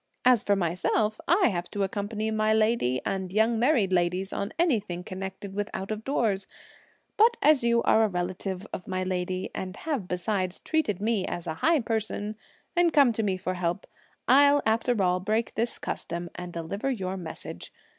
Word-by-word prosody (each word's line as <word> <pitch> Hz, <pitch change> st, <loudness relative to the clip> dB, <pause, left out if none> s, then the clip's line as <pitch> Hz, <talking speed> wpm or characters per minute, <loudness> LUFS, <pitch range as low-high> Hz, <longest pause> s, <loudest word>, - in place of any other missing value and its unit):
As 250 Hz, -3 st, +5 dB
for 200 Hz, -, +3 dB
myself, 195 Hz, -, 0 dB
I 350 Hz, -2 st, +4 dB
have 175 Hz, -3 st, -3 dB
to 205 Hz, -, -2 dB
accompany 210 Hz, +2 st, -2 dB
my 215 Hz, 0 st, +2 dB
lady 215 Hz, -, +2 dB
and 190 Hz, -2 st, -2 dB
young 220 Hz, +3 st, +2 dB
married 235 Hz, -7 st, +3 dB
ladies 180 Hz, +2 st, 0 dB
on 200 Hz, -, -3 dB
anything 210 Hz, -, 0 dB
connected 190 Hz, +1 st, -6 dB
with 205 Hz, +1 st, -2 dB
out 195 Hz, +2 st, -4 dB
of 215 Hz, 0 st, -4 dB
doors; 215 Hz, -8 st, 0 dB, 0.7 s
but 460 Hz, +2 st, +5 dB
as 295 Hz, -3 st, +4 dB
you 235 Hz, 0 st, +3 dB
are 220 Hz, -, +4 dB
a -, -, +4 dB
relative 185 Hz, +1 st, -3 dB
of 180 Hz, -, -6 dB
my 185 Hz, -1 st, -1 dB
lady 185 Hz, +1 st, -2 dB
and 185 Hz, 0 st, -5 dB
have 280 Hz, -, -3 dB
besides 185 Hz, +1 st, -2 dB
treated 215 Hz, -, -1 dB
me 215 Hz, -3 st, 0 dB
as 175 Hz, -, -4 dB
a 160 Hz, -, -2 dB
high 325 Hz, -3 st, +4 dB
person 220 Hz, -2 st, -2 dB, 0.4 s
and 350 Hz, -1 st, +4 dB
come 275 Hz, -6 st, +5 dB
to 225 Hz, -, -1 dB
me 195 Hz, -3 st, 0 dB
for 185 Hz, 0 st, -3 dB
help, 175 Hz, 0 st, -2 dB, 0.4 s
I'll, 285 Hz, +2 st, +6 dB
after 225 Hz, +1 st, +1 dB
all, 180 Hz, 0 st, +2 dB
break 215 Hz, +5 st, -1 dB
this 230 Hz, +2 st, -1 dB
custom 170 Hz, 0 st, -5 dB
and 180 Hz, 0 st, -7 dB
deliver 170 Hz, +9 st, -3 dB
your 190 Hz, -7 st, -2 dB
message. 175 Hz, -4 st, -8 dB
205 Hz, 180 wpm, -27 LUFS, 185-230 Hz, 0.7 s, I'll